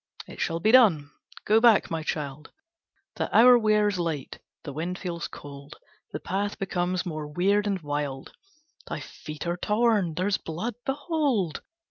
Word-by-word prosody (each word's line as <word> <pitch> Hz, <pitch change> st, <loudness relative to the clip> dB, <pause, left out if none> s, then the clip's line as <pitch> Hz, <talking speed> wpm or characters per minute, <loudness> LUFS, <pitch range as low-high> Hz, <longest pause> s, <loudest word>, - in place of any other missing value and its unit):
"It -, -, -11 dB
shall 165 Hz, 0 st, -1 dB
be 215 Hz, +6 st, +3 dB
done. 190 Hz, -, +5 dB, 0.3 s
Go 215 Hz, +1 st, +5 dB
back, 230 Hz, -7 st, +5 dB
my 165 Hz, -1 st, -2 dB
child, 150 Hz, -2 st, -4 dB, 0.7 s
The -, -, -2 dB
hour 245 Hz, +2 st, +8 dB
wears 210 Hz, -4 st, +2 dB
late, 160 Hz, -5 st, -3 dB, 0.2 s
the 145 Hz, -, -7 dB
wind 170 Hz, +5 st, -3 dB
feels 170 Hz, -3 st, -4 dB
cold, 140 Hz, 0 st, -11 dB, 0.4 s
The 150 Hz, -, -4 dB
path 200 Hz, +5 st, -3 dB
becomes 180 Hz, -1 st, -1 dB
more 155 Hz, -3 st, -4 dB
weird 200 Hz, +7 st, +1 dB
and 195 Hz, -2 st, -1 dB
wild, 145 Hz, -2 st, -4 dB, 0.5 s
Thy -, -, -4 dB
feet 150 Hz, +1 st, -8 dB
are 170 Hz, +1 st, -1 dB
torn, 210 Hz, -4 st, +1 dB
there's 185 Hz, +3 st, +1 dB
blood, 175 Hz, +9 st, -4 dB
behold! 275 Hz, -, -1 dB
180 Hz, 150 wpm, -26 LUFS, 155-210 Hz, 0.7 s, hour